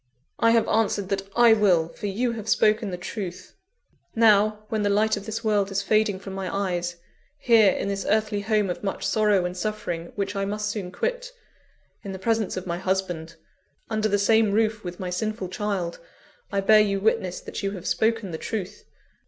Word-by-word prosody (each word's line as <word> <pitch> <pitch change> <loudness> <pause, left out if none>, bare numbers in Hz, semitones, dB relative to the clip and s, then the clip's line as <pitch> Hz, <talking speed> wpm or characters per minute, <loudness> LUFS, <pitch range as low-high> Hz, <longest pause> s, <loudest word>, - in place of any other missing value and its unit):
"I 230 - +4
have 230 -1 +3
answered 210 -3 +1
that 195 0 -2
I 240 -1 +7
will; 185 -7 +3
for 205 - -6
you 235 +5 0
have 220 -2 -6
spoken 215 -1 +3
the 180 - -4
truth. 185 -1 -7 0.6
Now, 215 -1 +4
when 220 -3 -1
the 205 - +1
light 215 +2 +2
of 205 0 -8
this 220 +2 -4
world 205 -3 +1
is 200 0 -1
fading 215 -1 +2
from 195 0 -8
my 190 -1 -4
eyes; 175 -3 -2 0.4
here, 230 -7 +5
in - - -3
this 200 0 -2
earthly 215 -1 +1
home 210 -2 +1
of 180 - -7
much 195 - -3
sorrow 210 -4 +2
and 180 0 -3
suffering, 180 -4 -4
which 200 0 -3
I 195 - -1
must 210 +1 -2
soon 200 -4 -4
quit - - -3 0.7
in 195 -2 -6
the - - -5
presence 220 0 -1
of 185 - -4
my 175 -1 -3
husband 180 -3 -2 0.6
under 215 0 +1
the 205 - +2
same 220 0 +3
roof 215 0 +1
with 175 -1 -7
my 180 -1 -4
sinful 215 0 -3
child 185 -3 -3 0.5
I 200 -1 0
bear 215 +2 +6
you 200 -2 +1
witness 190 -3 0
that - - -6
you 195 - -1
have 185 -4 -8
spoken 220 +2 0
the 160 - -5
truth. 205 -2 -5
205 Hz, 195 wpm, -25 LUFS, 190-215 Hz, 0.7 s, I